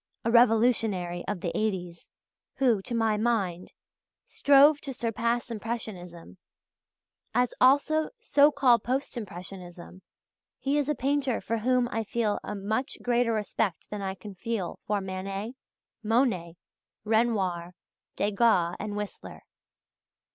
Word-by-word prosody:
_, - - -65 0.2
as - - +2
a - - -3
revolutionary 220 -7 +3
of 205 -4 -3
the 170 - -3
'eighties 180 -5 -3 0.5
who, 245 -6 +2
to 235 - -4
my 225 -2 +2
mind, 200 -6 -1 0.5
strove 285 +1 +5
to 270 -3 -6
surpass 235 +1 -1
impressionism, 200 -7 -6 1.0
as 250 -1 +2
also 290 +4 +4
so 295 -11 +4
called 255 -5 +3
post 265 +3 -2
impressionism, 185 -4 -8 0.6
he 280 +2 0
is 290 0 -1
a 300 - +1
painter 270 -2 0
for 230 0 -2
whom 250 +2 +2
I 225 - -1
feel 220 -1 -1
a 210 - -5
much 215 +6 -2
greater 240 -1 +2
respect 210 -4 -2
than 210 -1 -4
I 190 -1 -3
can 205 +1 -10
feel 195 -1 -4
for 205 -1 0
Manet, 195 +4 -5 0.5
Monet, 210 -7 +1 0.5
Renoir, 200 -6 0 0.4
Degas, 200 -4 +2
and 210 0 -4
Whistler. 210 -1 -7
220 Hz, 130 wpm, -28 LUFS, 190-245 Hz, 1.0 s, strove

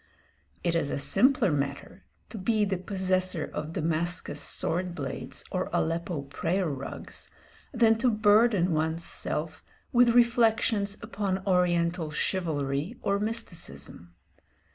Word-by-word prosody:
It 170 - +1
is 165 -4 0
a - - -1
simpler 250 - +3
matter 140 +6 -3 0.3
to 220 - -6
be 215 +2 +2
the 190 -2 -1
possessor 185 -3 -1
of 150 +2 -4
Damascus 170 +1 -1
sword 175 +1 -1
blades 135 -4 -5
or - - -1
Aleppo 165 -2 -1
prayer 175 +6 -1
rugs 140 -3 -6 0.4
than 225 -3 +4
to 250 +1 +3
burden 210 -3 +4
one's 160 +1 0
self - - -4 0.3
with 240 -1 +5
reflections 225 -4 +3
upon 195 -3 -2
oriental 175 -3 +2
chivalry 155 - -1
or 200 0 +1
mysticism. 205 - -4
185 Hz, 120 wpm, -28 LUFS, 160-215 Hz, 0.4 s, with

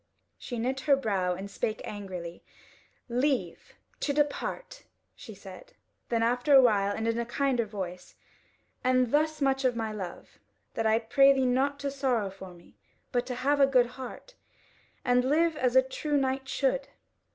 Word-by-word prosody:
She 245 - -6
knit 255 +4 -1
her 280 - +8
brow 195 -8 -1
and 190 +2 -6
spake 215 +2 -3
angrily: 185 -5 -7 0.6
"Leave 245 - -1 0.2
to 285 - -1
depart," 300 - -2 0.3
she - - -11
said. - - -12 0.4
Then 230 -1 +1
after 245 +4 +3
a - - +10
while, 200 -4 +3
and 220 +1 -2
in 230 +1 0
a - - 0
kinder 250 -1 0
voice: 185 -4 -7 0.7
"And 255 -1 +2
thus 310 +1 +1
much 270 0 +1
of 255 -2 +2
my 225 -1 -2
love, 190 -5 -8 0.3
that 225 -1 0
I 220 0 +4
pray 275 +5 +5
thee 265 -1 +1
not 270 +3 +1
to 280 -1 -2
sorrow 255 -7 0
for 190 -1 -11
me, 170 - -20 0.3
but 245 0 0
to 250 - -3
have 290 +1 +3
a 275 - +6
good 255 -3 +4
heart, 260 - -9 0.7
and 250 0 +3
live 315 +5 +2
as 255 -4 0
a 260 - +7
true 290 +3 -2
knight 265 0 -1
should." - - 0
250 Hz, 170 wpm, -28 LUFS, 220-275 Hz, 0.7 s, a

